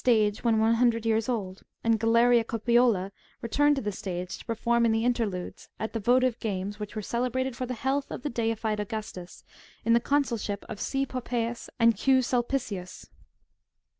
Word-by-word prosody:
203 215 -4 +3
when 230 -2 +2
one 220 +1 +4
hundred 230 -1 +2
years 225 +1 +1
old, 195 -6 -3 0.2
and 230 -1 +2
Galeria 230 +1 +4
Copiola 230 -4 +2 0.3
returned 290 +5 +3
to 270 - -3
the 210 - -1
stage, 185 -1 -5
to - - -12
perform 235 +1 +1
in 230 - +4
the 225 +1 +1
interludes,^^ 220 -7 -2
at 220 - -4
the 225 - -1
votive 250 +2 +2
games 205 -1 -3
which 210 +1 -6
were 215 - -3
celebrated 250 +3 -1
for 255 +1 -4
the 250 - -3
health 270 +4 -1
of - - -6
the 295 - -1
deified 225 -2 -1
Augustus, 210 -4 -6 0.4
in 230 - +4
the 235 - +5
consulship 235 -7 -1
of 215 -2 -7
C. 270 0 0
Poppaeus 240 -2 -3
and 230 -1 +5
Q,. 260 +5 +3
Sulpicius. 240 -7 -3
230 Hz, 175 wpm, -27 LUFS, 215-245 Hz, 0.4 s, the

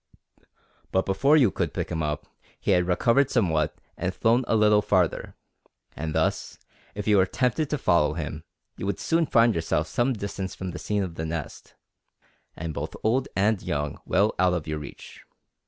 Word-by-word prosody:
But 95 - +1
before 140 +11 +3
you 125 -9 +4
could - - -2
pick - - -2
him 80 -2 -1
up, 75 -1 -2 0.3
he - - 0
had 90 -2 +3
recovered 115 +9 +3
somewhat 80 - +1 0.2
and 95 +1 -3
flown 120 +3 +3
a - - +2
little 105 -1 +5
farther; 95 -5 0 0.6
and 80 0 -4
thus, - - -1 0.4
if 105 0 -5
you 105 -1 +5
were 95 -1 +4
tempted 130 - 0
to 150 - 0
follow 75 - +2
him, 75 -1 -5 0.3
you 100 - -4
would 100 - -2
soon 165 -1 +1
find 115 0 +4
yourself 80 -2 0
some 120 +8 0
distance 100 -3 -5
from 95 -1 -5
the 90 - -7
scene 105 -1 -1
of 90 -3 -5
the 80 - -3
nest, 80 -3 -6 0.8
and 80 -1 -5
both - - -5
old 125 +5 +1
and 100 +1 +2
young 75 0 -3
well 105 +3 +2
out 90 -1 +4
of 80 -3 -3
your 75 -1 -3
reach. 75 - -11
95 Hz, 185 wpm, -26 LUFS, 80-115 Hz, 0.8 s, little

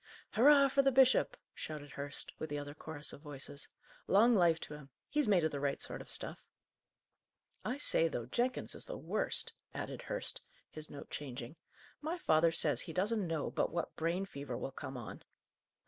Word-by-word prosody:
"Hurrah 280 +3 +7
for 275 - +4
the 270 0 +4
bishop!" 260 0 +5 0.2
shouted 150 -2 -6
Hurst, 140 0 -5
with 155 - -3
the 145 - -2
other 145 0 -5
chorus 150 -1 -4
of - - -10
voices. 145 -1 -6 0.4
"Long 225 +5 +6
life 170 -4 +5
to - - -6
him! 150 -2 -10 0.2
He's 295 -3 +2
made 190 -5 +5
of 155 - +2
the 140 - -3
right 140 0 0
sort - - -5
of - - -12
stuff! - - -4 1.2
I 255 - -1
say, 165 - +3
though, 120 -7 -3
Jenkins 245 - 0
is - - -4
the - - -5
worst," - - -1 0.2
added - - -4
Hurst, - - -3 0.3
his 155 0 -6
note 145 - -9
changing. 130 -1 -5 0.5
"My 320 +4 -2
father 160 - +4
says 150 -5 +3
he 165 - -6
doesn't 200 +2 +1
know 160 -3 -1
but - - +1
what 170 0 -2
brain 170 +4 0
fever 140 -8 -5
will 135 - -4
come 135 0 -6
on." 120 - -7
160 Hz, 185 wpm, -35 LUFS, 145-225 Hz, 1.2 s, Hurrah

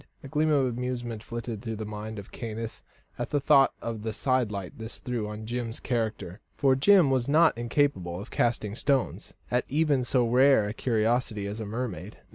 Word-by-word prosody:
A - - -7
gleam 155 +3 +1
of 140 -3 +3
amusement 120 -2 -3
flitted 115 -2 -5
through 115 -1 -4
the 110 0 -5
mind 105 +1 -6
of 100 0 -9
Caius 115 -1 -6 0.4
at - - -2
the 145 - +1
thought 135 0 +5
of 115 -2 -4
the 110 0 -3
sidelight 110 -8 -1
this 110 +1 -7
threw 120 -5 -3
on 105 +1 -7
Jim's 120 0 -4
character. 110 -6 -2 0.2
For 135 -2 +4
Jim 170 +1 +5
was 130 -1 +1
not 160 +3 +5
incapable 115 -8 0
of 105 - -9
casting 115 -4 0
stones 135 +3 -1 0.2
at 125 0 +2
even 145 -2 +2
so 120 -1 +2
rare 130 -1 +5
a 105 - -3
curiosity 115 -2 0
as 105 +2 -5
a 110 - -4
mermaid. 105 -4 -5
120 Hz, 185 wpm, -28 LUFS, 110-130 Hz, 0.4 s, thought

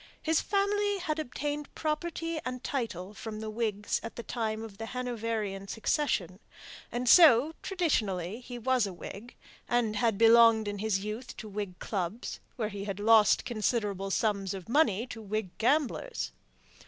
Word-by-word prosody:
His 320 0 +1
family 410 0 +1
had 320 -4 -2
obtained 295 +1 -4
property 330 +1 -2
and 255 0 -5
title 210 - -3
from 215 +1 -6
the 215 0 -5
Whigs 215 -2 -1
at 230 - -7
the 235 - -6
time 220 -2 -2
of 210 -2 -10
the 225 - -4
Hanoverian 225 -6 -3
succession; 215 - -1 0.5
and 245 +1 -2
so, 300 -1 +7
traditionally, 215 - -1
he 245 0 -8
was 250 -2 +2
a 190 - -6
Whig, 205 +6 -9 0.3
and 230 -3 +1
had 225 -2 +2
belonged 230 -1 +6
in 205 -1 -3
his 205 -2 0
youth 220 +5 -6
to 220 - -7
Whig 200 -3 -5
clubs, 195 +2 -4 0.2
where 215 -3 -2
he 200 -1 -6
had 200 -1 -4
lost 215 0 +5
considerable 210 -4 -1
sums 200 -2 0
of 185 -3 -8
money 235 -5 +3
to 225 -3 -8
Whig 210 -3 -3
gamblers. 300 - 0
225 Hz, 155 wpm, -30 LUFS, 205-255 Hz, 0.5 s, so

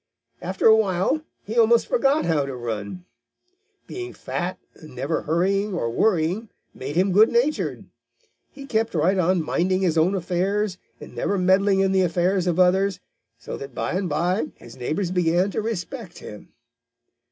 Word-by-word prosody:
After 185 +2 -3
a 220 - +8
while 205 - +1 0.2
he 225 +3 -1
almost 230 +1 +4
forgot 310 - +2
how 160 -4 +1
to 135 - -5
run. 105 -6 -5 0.8
Being 370 0 -7
fat 180 +1 -4 0.2
and 155 -5 -14
never 135 +6 -2
hurrying 195 +5 0
or 115 -9 -1
worrying 185 - +1 0.2
made 140 +3 -6
him 185 +3 +2
good 215 +5 +6
natured. 250 +6 0 0.7
He 275 -1 -10
kept 225 -6 -1
right 180 +5 +2
on 180 -1 +2
minding 185 +4 0
his 165 -4 +2
own 180 +5 +2
affairs 190 +2 -1 0.2
and - - -11
never 200 - -1
meddling 190 +1 +3
in 195 0 +2
the 190 0 +3
affairs 180 +1 +1
of 175 0 0
others, 190 +1 +3 0.4
so 115 - -7
that 135 -2 -9
by - - -2
and 185 0 -1
by 170 +1 0
his 115 - -14
neighbors 155 +9 -2
began 180 +2 +1
to - - -2
respect 220 -1 -5
him. 105 - -11
185 Hz, 165 wpm, -23 LUFS, 165-205 Hz, 0.8 s, a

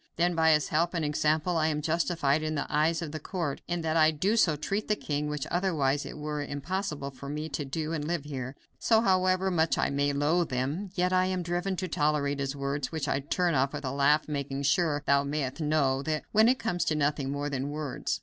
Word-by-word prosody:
Then, 175 +1 +2
by 160 -1 +3
his 150 -1 +1
help 170 +3 +1
and 165 -2 0
example 155 +3 +1
I 155 -1 +2
am 150 -1 0
justified 160 -2 +1
in 155 0 -2
the 145 - -1
eyes 160 +3 +2
of 155 - -5
the 155 - -5
court 165 -3 -3
in 175 0 -2
that 160 0 -1
I 155 -1 +5 0.2
so 175 -9 +4
treat 195 +8 -3
the 210 - +2
king, 150 -5 -2
which 150 -2 -3
otherwise 155 -6 +1
it - - -8
were 150 0 -3
impossible 145 0 -3
for 140 +1 -9
me 150 +2 -4
to 145 - -3
do 155 +4 -3
and 150 -2 -3
live 170 -3 -1
here. 135 -2 -5 0.2
So, 225 -1 +4
however 185 -2 +2
much 160 -2 +2
I - - +1
may 140 +1 +1
loathe 155 +4 +1
them, 140 +10 -2
yet 180 0 +1
I 185 0 +4
am 185 -1 -1
driven 175 +3 -1
to 185 +1 -3
tolerate 145 -3 0
his 135 0 -2
words, 140 0 -3
which 155 -3 -3
I 135 - +1
turn 175 +5 0
off 135 0 +1
with - - -5
a 130 - -1
laugh, 145 +3 +3
making 140 -2 -3
sure, 150 -1 +2
thou 140 0 +4
mayest 140 +1 -3
know, 145 -3 +2
that 155 +1 -2
it 220 +4 +5
come 225 -8 -2
to 155 - +1
nothing 145 -2 0
more 145 +1 -2
than 135 0 -2
words. 145 -3 -3
155 Hz, 225 wpm, -29 LUFS, 140-170 Hz, 0.2 s, I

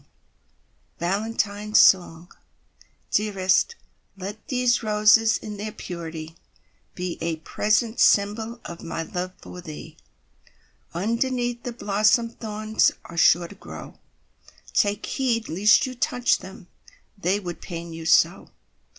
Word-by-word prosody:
Y - - -28
Z - - -36 0.9
Valentine 205 +2 -2
Song 175 -3 +4 0.8
Dearest, 205 - +2 0.4
let 200 +3 -8
these 250 -2 +2
roses 215 +1 +4
In 210 -1 -8
their 215 +1 -5
purity, 165 -4 -7 0.6
Be 180 -1 -4
a 165 0 -1
present 215 +8 0
symbol 220 +3 +2
Of 170 -1 -8
my 165 0 -4
love 180 0 -4
for 180 - -9
thee. 155 -4 -10 1.0
Underneath 240 +5 -1
the 245 - -5
blossom 215 +1 +2
Thorns 215 -1 0
are 170 - -10
sure 170 +1 +4
to 200 - -12
grow; 200 - -11 0.7
Take 205 +1 +1
heed 235 -4 -1
lest 210 - +4
you 260 - -5
touch 245 0 +1
them, - - -11 0.5
They 195 0 0
would 175 -4 -7
pain 170 -2 -7
you 165 0 -6
so! - - +3
205 Hz, 125 wpm, -24 LUFS, 175-225 Hz, 1.0 s, Song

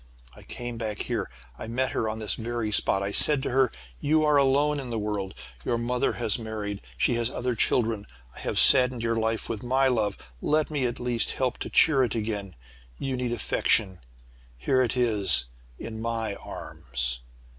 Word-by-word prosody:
"I - - -14
came 120 -1 -7
back 110 -2 -3
here. - - -2 0.3
I - - -6
met 130 +3 -1
her 110 - -1
on 110 - -4
this 110 -2 -1
very 115 -1 -3
spot. 100 -1 +3
I 100 - -2
said 140 +5 +6
to - - -2
her, 130 -1 +3 0.3
'You 155 +1 +2
are 150 -1 +4
alone 140 +2 +3
in 130 -3 -6
the 115 - -2
world 105 -3 -3 0.3
your 120 - 0
mother 120 +1 0
has 115 -1 0
married 105 -3 -5 0.2
she - - +2
has 115 - 0
other 125 -1 -2
children. 110 -2 +1 0.3
I - - -11
have - - -3
saddened 125 -3 +4
your 115 0 +1
life 110 0 -1
with 110 -3 -4
my 130 +2 +2
love. 105 -5 0 0.2
Let 155 0 +1
me 140 -4 0
at 120 +1 -4
least 120 -2 +1
help 130 -3 -1
to - - -4
cheer 135 -5 +5
it 120 -3 -1
again. 105 -4 -3 0.4
You 135 -1 -2
need 125 -1 -2
affection. 100 -4 +1 0.6
Here 130 - +2
it 125 0 0
is 105 - +3 0.3
in 110 0 -7
my 115 -2 -2
arms!' - - -4
115 Hz, 190 wpm, -27 LUFS, 105-130 Hz, 0.6 s, said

